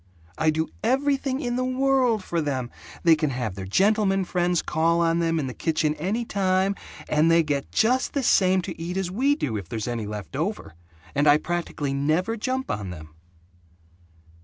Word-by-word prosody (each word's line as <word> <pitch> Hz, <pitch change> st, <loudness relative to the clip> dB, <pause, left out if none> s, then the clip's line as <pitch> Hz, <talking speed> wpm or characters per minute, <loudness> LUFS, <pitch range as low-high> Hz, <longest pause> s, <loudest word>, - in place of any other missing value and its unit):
I 160 Hz, -, +2 dB
do 160 Hz, +1 st, 0 dB, 0.2 s
everything 270 Hz, +2 st, +1 dB
in 245 Hz, -2 st, -2 dB
the 255 Hz, -, 0 dB
world 255 Hz, -4 st, +2 dB
for 170 Hz, -2 st, -1 dB
them. 130 Hz, -5 st, -2 dB, 0.3 s
They 165 Hz, -1 st, +6 dB
can 155 Hz, -1 st, -1 dB
have 125 Hz, -6 st, -3 dB
their 95 Hz, 0 st, -7 dB
gentleman 195 Hz, -, +2 dB
friends 175 Hz, -1 st, 0 dB
call 165 Hz, +2 st, +1 dB
on 165 Hz, 0 st, +2 dB
them 165 Hz, -1 st, +1 dB
in 145 Hz, -, -2 dB
the 130 Hz, -, -5 dB
kitchen 155 Hz, 0 st, 0 dB
any 195 Hz, +10 st, -2 dB
time, 190 Hz, -1 st, +1 dB, 0.3 s
and 155 Hz, +2 st, +3 dB
they 165 Hz, 0 st, +5 dB
get 145 Hz, -2 st, -2 dB
just 250 Hz, +4 st, +2 dB
the 280 Hz, -, -1 dB
same 185 Hz, -4 st, +3 dB
to 170 Hz, -3 st, -7 dB
eat 175 Hz, +3 st, -4 dB
as 190 Hz, -2 st, -2 dB
we 270 Hz, +8 st, +2 dB
do, 130 Hz, -, -2 dB
if 95 Hz, -4 st, -7 dB
there's, 110 Hz, -1 st, -4 dB
any 115 Hz, -3 st, -3 dB
left 105 Hz, +4 st, -7 dB
over, 165 Hz, -, -3 dB, 0.4 s
and 145 Hz, +1 st, +2 dB
I 145 Hz, 0 st, +7 dB
practically 155 Hz, -4 st, -3 dB
never 155 Hz, +10 st, 0 dB
jump 260 Hz, +4 st, -2 dB
on 100 Hz, -3 st, -4 dB
them." 80 Hz, -3 st, -10 dB
170 Hz, 185 wpm, -25 LUFS, 145-215 Hz, 0.4 s, I